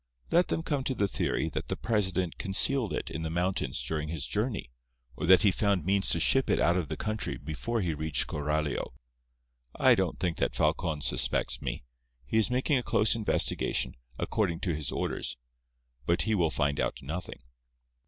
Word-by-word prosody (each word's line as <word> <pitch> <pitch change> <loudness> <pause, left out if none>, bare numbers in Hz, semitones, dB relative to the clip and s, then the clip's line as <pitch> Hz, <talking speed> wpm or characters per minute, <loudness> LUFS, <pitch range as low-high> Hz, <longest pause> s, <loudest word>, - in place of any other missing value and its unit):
Let 175 +1 +4
them 165 - -1
come 145 -5 -1
to 130 - 0
the 100 - +1
theory - - -1
that - - -4
the - - -2
president 95 -6 0
concealed 110 +4 +3
it - - -3
in 80 - -4
the 80 - -3
mountains 90 +3 -1
during 75 -1 -3
his 80 -3 -2
journey, 105 - -2 0.4
or - - -3
that 95 +4 +7
he 100 - +5
found 100 -3 +1
means 95 +1 +2
to 85 - +2
ship 135 +10 +3
it - - +3
out 85 - +3
of 90 -4 -1
the 80 - -4
country 110 0 -2
before 80 - -3
he 85 -4 0
reached 80 +1 -1
Coralio. 75 0 -2 0.8
I - - +5
don't - - 0
think 90 -3 -1
that - - 0
Falcon 75 -2 0
suspects - - 0
me. - - -4 0.4
He 110 - +1
is 110 - +2
making 130 +2 +2
a - - -2
close 110 -2 +2
investigation, 105 - 0 0.2
according 85 -1 -1
to 90 -5 0
his 75 -3 -3
orders, 60 - -2 0.7
but 85 - +3
he 110 - 0
will 85 -6 +2
find 70 -2 0
out - - -2
nothing." 80 -1 -6
90 Hz, 185 wpm, -29 LUFS, 80-110 Hz, 0.8 s, that